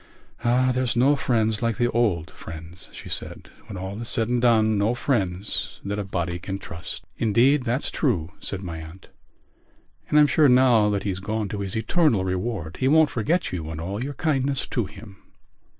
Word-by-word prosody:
"Ah, 125 +2 +3
there's 125 -2 0
no 135 +5 +4
friends 110 -5 +1
like 115 -2 0
the 120 -1 +1
old 100 -9 0
friends," 80 +2 -10
she - - -10
said, - - -5 0.2
"when 100 - -7
all 95 +4 -5
is 115 - -5
said 115 -2 +1
and 120 -1 +1
done, 110 -3 +4
no 105 +4 +1
friends 100 -7 -1
that 100 +1 -2
a - - -1
body 85 -2 -3
can 95 +2 -4
trust." 80 -4 -7 0.2
"Indeed, 125 +5 +3
that's 125 +4 -1
true," 90 - 0
said 100 -1 -5
my 85 -3 -5
aunt. 80 +3 -12 1.0
"And 150 - +5
I'm 150 - +7
sure 145 0 +4
now 125 -4 +5
that 100 -1 -1
he's 95 -2 -2
gone 105 +1 -3
to 105 - -4
his 100 0 -4
eternal 115 - +2
reward 95 -2 -3
he 130 - +1
won't 155 +1 +5
forget 160 +11 0
you 80 -4 -4
and 80 -1 -6
all 100 +7 -4
your 140 +1 -5
kindness 140 -3 0
to 120 -5 -1
him." 100 -1 -13
110 Hz, 190 wpm, -24 LUFS, 95-125 Hz, 1.0 s, I'm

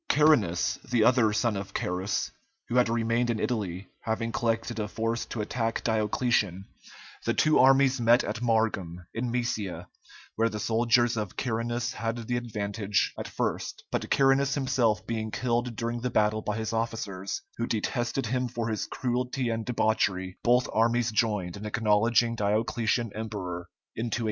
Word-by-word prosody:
Carinus, 135 - +3
the 120 -3 +3
other 115 -2 +4
son 110 +1 +1
of 100 0 -5
Carus, 90 +2 -1 0.4
who 120 - -3
had 125 -2 +4
remained 115 +1 +1
in 115 -2 0
Italy, 100 -6 -2
having 115 +1 -2
collected 115 0 -1
a 105 - -1
force 115 +2 -2
to 115 - -4
attack 115 +1 -2
Diocletian, 105 -3 +1 0.6
the - - 0
two 155 0 +4
armies 135 0 +5
met 120 +2 +5
at 110 +3 -4
Margum, 105 -7 0
in 120 +1 -2
Moesia, 115 -6 -2 0.5
where 115 +1 +2
the 105 - -5
soldiers 115 +1 +2
of 105 -4 -4
Carinus 120 +1 -1
had 115 0 -2
the 125 - 0
advantage 105 -3 -1
at - - -5
first, - - -3
but - - -2
Carinus 135 0 +3
himself 130 -6 +1
being 110 -1 -2
killed 120 +1 -1
during 120 +1 -3
the 125 - -1
battle 110 -1 +2
by 105 0 -2
his 110 0 -3
officers, 110 -4 -3
who 115 - -1
detested 120 +3 -1
him 125 +3 0
for 115 -1 -3
his 110 - -2
cruelty 125 0 -1
and 115 -1 -2
debauchery, 95 -6 0
both 125 +1 +4
armies 115 +1 +2
joined 105 -5 0
in 100 - -8
acknowledging 115 +2 +2
Diocletian 110 +2 0
emperor 95 -6 -5 0.3
in 115 +1 -2
285. 115 - -1
115 Hz, 160 wpm, -28 LUFS, 105-120 Hz, 0.6 s, armies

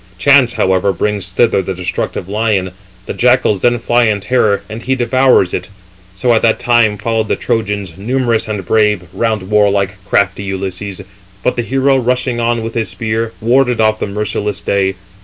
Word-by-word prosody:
Chance, 140 -2 +4
however, 95 +1 +1
brings 100 0 -2
thither 100 +2 +2
the 95 0 -4
destructive 90 0 -4
lion: 100 -3 0 0.3
the - - -5
jackals 125 -5 +2
then 120 0 +3
fly 120 +1 +2
in 105 -2 +1
terror, 100 -3 +1
and 110 +1 -7
he 130 +1 0
devours. 125 -6 +2 0.6
So 120 +6 +1
at 110 - +2
that 115 -1 +2
time 120 -3 +2
followed 110 0 -1
the - - 0
Trojans, 105 -5 -2
numerous 120 0 0
and 105 -4 -4
brave, 105 -2 +2
round 110 -4 -2
warlike, 100 -1 +1
crafty 100 +1 0
Ulysses; 95 0 -5 0.4
but 125 - +1
the 120 - -1
hero, 135 +3 +1
rushing 125 -1 0
on 115 0 0
with 115 0 -5
his 110 -4 -2
spear, 110 +2 -2
warded 125 +1 +2
off 110 0 +2
the - - -2
merciless 105 0 -2
day. 95 -1 0
110 Hz, 170 wpm, -15 LUFS, 100-120 Hz, 0.6 s, Chance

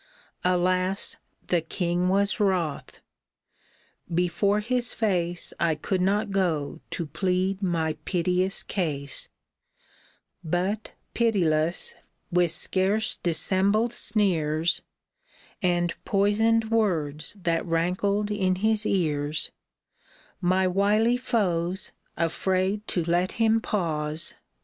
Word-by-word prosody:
Alas! 185 +1 +1 0.3
the 175 -2 +1
king 175 +2 -1
was 200 +3 +2
wroth. 180 -7 -1 1.1
Before 180 +4 +1
his 240 +2 0
face 175 -5 0
I 165 -2 +2
could 185 +5 -1
not 205 +3 +1
go 165 -6 -1
to 170 - -3
plead 185 +5 -1
my 165 -4 0
piteous 180 +1 0
case; 145 - -2 1.1
But, 185 +6 -2 0.2
pitiless, 170 -8 +1 0.4
with 175 -1 +3
scarce 190 +6 +1
dissembled 200 +7 +2
sneers, 175 -7 +1 0.8
And 175 -2 +1
poisoned 220 +3 +2
words 165 -7 0
that 165 -2 0
rankled 190 +5 0
in 190 -3 +1
his 215 +2 +1
ears, 150 -5 0 0.9
My 185 +1 +2
wily 210 +5 +3
foes, 190 -7 -1 0.3
afraid 190 +5 0
to 175 -3 -1
let 175 +2 +1
him 225 0 +2
pause. 160 -5 -1
185 Hz, 95 wpm, -26 LUFS, 170-205 Hz, 1.1 s, with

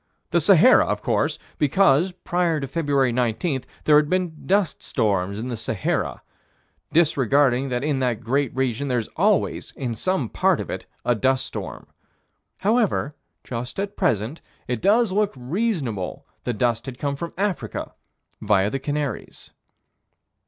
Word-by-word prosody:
The - - +4
Sahara, - - +6
of - - -2
course - - +1 0.2
because, 150 +2 +4
prior 175 -2 0
to 135 - -4
February 140 -3 +1
19, 125 +4 0 0.2
there 150 -1 +6
had 150 0 +3
been 180 -4 -2
dust 195 -3 +1
storms 100 -2 0
in 115 +3 -4
the 120 - -2
Sahara 110 -4 -2 0.7
disregarding 140 -4 +3
that 125 +1 -2
in 145 -2 0
that 125 -3 -1
great 135 +2 0
region 130 +1 -1
there's 120 -4 0
always, 200 +1 +1
in 125 -4 -3
some 155 - -1
part - - +2
of - - -4
it, - - -6 0.2
a 120 - +3
dust 130 +3 +1
storm. - - -7 0.8
However, 210 - +1 0.3
just 125 +6 -5
at 200 +1 -3
present, 125 - 0 0.3
it 125 -2 -2
does 220 +1 +3
look 205 +1 +1
reasonable 135 - -2 0.2
that 120 -3 -2
dust 120 +1 0
had 130 -2 -6
come 140 +1 -2
from 170 +4 -6
Africa, 195 -2 -2 0.5
via 100 -1 +2
the 135 - -2
Canaries. 145 0 -4
135 Hz, 145 wpm, -23 LUFS, 120-170 Hz, 0.8 s, Sahara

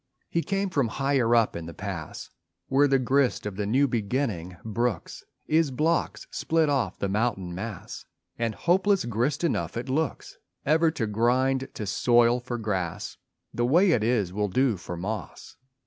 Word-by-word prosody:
He 170 - +1
came 195 +1 -1
from 140 -7 +1
higher 130 -1 +1
up 115 -2 +3
in 85 -1 -5
the 85 - -9
pass - - -6 0.4
Where 140 +2 +4
the 135 -1 +4
grist 130 -1 +1
of 105 -2 -4
the 100 0 -2
new 135 +6 +3
beginning 105 -6 -2
brooks 110 -4 -2 0.2
Is 160 -1 +2
blocks 155 +6 0
split 160 -2 +1
off 135 -5 0
the 100 - -1
mountain 95 -3 -1
mass 100 +1 -7 0.3
And 115 -2 -1
hopeless 190 +1 +2
grist 120 +7 -1
enough 165 - -1
it 125 +3 -4
looks 150 +2 -2 0.3
Ever 160 +3 +4
to 150 -8 -2
grind 130 +5 +1
to 105 - -4
soil 120 +3 +3
for 120 0 -5
grass. 95 -7 -3 0.4
(The 120 - -1
way 175 +8 +5
it 115 -9 +2
is 110 -6 +1
will 105 0 -1
do 125 +3 +2
for 90 -1 -7
moss.) 105 +5 -6
120 Hz, 165 wpm, -26 LUFS, 105-140 Hz, 0.4 s, way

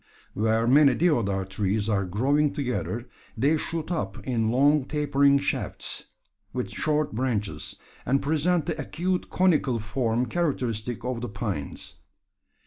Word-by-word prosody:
Where 110 +2 +1
many 135 +1 +6
deodar 115 - +1
trees 100 +2 -1
are 100 -3 +1
growing 140 +10 +1
together, 125 -3 -3 0.3
they 145 +4 +3
shoot 160 +1 -3
up 105 - -2
in 115 -4 0
long 140 +3 +4
tapering 140 -1 +3
shafts, 140 - -2 0.5
with 125 -1 -3
short 150 -3 0
branches, 110 -4 -2 0.3
and 135 +3 +2
present 160 +3 +1
the 155 - -2
acute 180 +5 -2
conical 155 -9 +2
form 115 +2 0
characteristic 125 -9 -2
of 125 -2 -2
the 120 - -4
pines. 100 -8 -5
130 Hz, 130 wpm, -26 LUFS, 110-150 Hz, 0.5 s, many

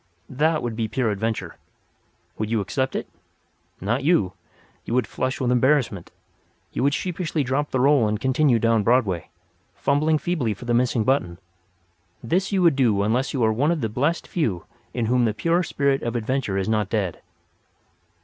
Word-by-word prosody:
That 155 +4 +1
would 120 -2 -3
be 110 -1 -1
pure 115 0 0
adventure. 110 +2 -3 0.8
Would 110 0 -2
you 115 -1 +1
accept 130 +7 -2
it? - - -3 0.7
Not 120 +8 -1
you. 120 - +2 0.5
You 115 - -3
would 125 - +2
flush 130 +1 -3
with 125 -2 0
embarrassment; 125 - +1 0.6
you - - -2
would 140 +2 +2
sheepishly 170 -4 -2
drop 135 +3 -1
the 130 - -1
roll 135 -3 +4
and 105 0 -1
continue 130 0 +3
down 115 -1 +2
Broadway, 105 -8 +1 0.5
fumbling 155 +3 +2
feebly 145 -10 -1
for 120 - -11
the 120 - 0
missing 120 -1 +2
button. 105 -10 0 0.9
This 185 +4 0
you 190 -2 +2
would 165 -5 +5
do 110 -7 +2
unless 120 +6 0
you 130 -4 -1
are 110 0 +3
one 140 +8 +1
of 170 -3 0
the 110 - -1
blessed 145 +10 -1
few 105 - -2 0.3
in 120 -2 -2
whom 125 +1 +2
the 110 -2 0
pure 170 +6 +1
spirit 140 -5 0
of 120 0 -3
adventure 120 -3 -1
is 95 - -1
not 105 -3 0
dead. 100 -5 -2
125 Hz, 180 wpm, -23 LUFS, 110-145 Hz, 0.9 s, would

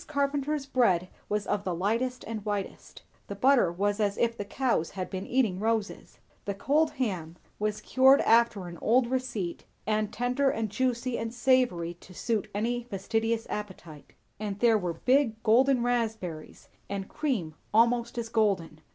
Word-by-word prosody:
Carpenter's 285 0 -1
bread 190 -10 +2 0.2
was 210 0 -1
of 205 -1 -1
the 180 -3 -2
lightest 230 +8 -1
and 220 -2 -5
whitest; 205 -2 -5 0.2
the 200 - -5
butter 250 -4 +4
was 205 +4 -1
as 205 -1 0
if 230 -1 +1
the 205 - -4
cows 225 -5 0
had 185 -2 -6
been 190 0 -4
eating 230 -8 +1
roses; 220 -1 -2 0.3
the 200 - -2
cold 295 +10 +2
ham 185 - -3 0.2
was 210 0 -1
cured 265 +4 +5
after 225 -4 +3
an 170 -1 -9
old 245 +3 +3
receipt, 235 -8 -3 0.2
and 215 -1 0
tender 250 +3 +1
and 220 -5 -2
juicy 250 +1 -1
and 225 0 -3
savoury 240 -10 +2
to 185 +1 -16
suit 225 0 -1
any 240 +4 0
fastidious 225 +1 -1
appetite; 175 -8 -7 0.3
and 205 -2 -4
there 230 +1 +4
were 180 -5 -1
big 250 - +1
golden 250 +3 +4
raspberries, 220 -10 -3 0.2
and 195 -1 -4
cream 220 - -2 0.2
almost 235 +2 +2
as 235 -1 -2
golden. 195 -9 0
220 Hz, 160 wpm, -28 LUFS, 195-245 Hz, 0.3 s, cured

